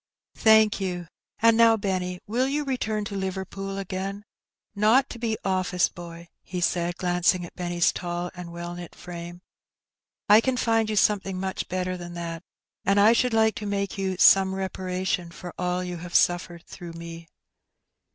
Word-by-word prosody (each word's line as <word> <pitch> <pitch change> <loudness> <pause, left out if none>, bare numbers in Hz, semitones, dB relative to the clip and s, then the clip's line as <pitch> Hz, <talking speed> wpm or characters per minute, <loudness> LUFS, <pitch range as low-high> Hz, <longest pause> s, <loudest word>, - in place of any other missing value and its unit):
*' - - -67
" - - -59
Thank 220 -1 +6
you. 180 -2 -3 0.4
And 230 0 +6
now, 230 0 +6
Benny, 185 -3 -2
will 245 +5 0
you 295 +2 -1
return 220 -6 -2
to 200 - -5
Liverpool 195 +1 -4
again? 195 +1 -4 0.5
Not 220 +6 +3
to 235 - -8
be 225 -2 -1
office 185 -2 +1
boy,*' 170 0 -10
he 180 - -5
said, 175 0 0
glancing 180 0 +1
at - - -12
Benny's 175 -1 +1
tall 175 0 -4
and 175 -1 -8
well 170 0 -6
knit 175 -1 -9
frame; 175 0 -8 0.9
"I 210 +2 +7
can 260 +1 0
find 225 -2 +2
you 215 - -1
something 195 -2 +2
much 190 0 -3
better 185 0 -2
than 175 0 -8
that, 165 -1 -5 0.4
and 195 +1 +3
I 215 +3 +7
should 240 0 +1
like 220 -1 +4
to 210 - -5
make 200 -1 -2
you 190 -1 -1
some 190 0 +6
reparation 185 -2 -2
for 175 +1 -9
all 180 0 -1
you 180 -1 -5
have 170 +1 -9
suflFered 175 -1 +2
through 175 -3 -10
me. 165 0 -9
185 Hz, 175 wpm, -26 LUFS, 175-210 Hz, 0.9 s, I